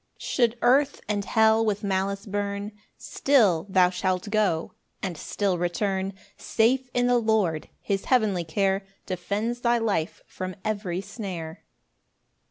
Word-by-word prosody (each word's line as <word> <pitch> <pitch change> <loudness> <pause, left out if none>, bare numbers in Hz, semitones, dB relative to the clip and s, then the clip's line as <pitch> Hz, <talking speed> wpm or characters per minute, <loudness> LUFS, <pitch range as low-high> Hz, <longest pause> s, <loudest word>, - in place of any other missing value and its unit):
6 - - -12
Should 240 -2 +1
earth 265 +4 +4
and 205 -1 -1
hell 220 0 +4
with 210 -2 -1
malice 195 0 -1
burn, 205 0 -3 0.3
Still 205 - +2
thou 185 -1 +4
shalt 185 +2 -1
go 200 -7 +1 0.3
and 185 -3 -2
still 185 +3 -1
return 190 +2 -1 0.2
Safe 250 +3 +1
in 245 0 +3
the 245 0 +4
Lord 215 -9 +1
his 195 -1 -2
heavenly 215 -8 +2
care 195 +4 0 0.2
Defends 205 +6 -2
thy 240 0 +3
life 205 -8 -1
from 185 0 -6
every 200 -4 -2
snare. 185 -6 -7
200 Hz, 135 wpm, -26 LUFS, 185-220 Hz, 0.3 s, earth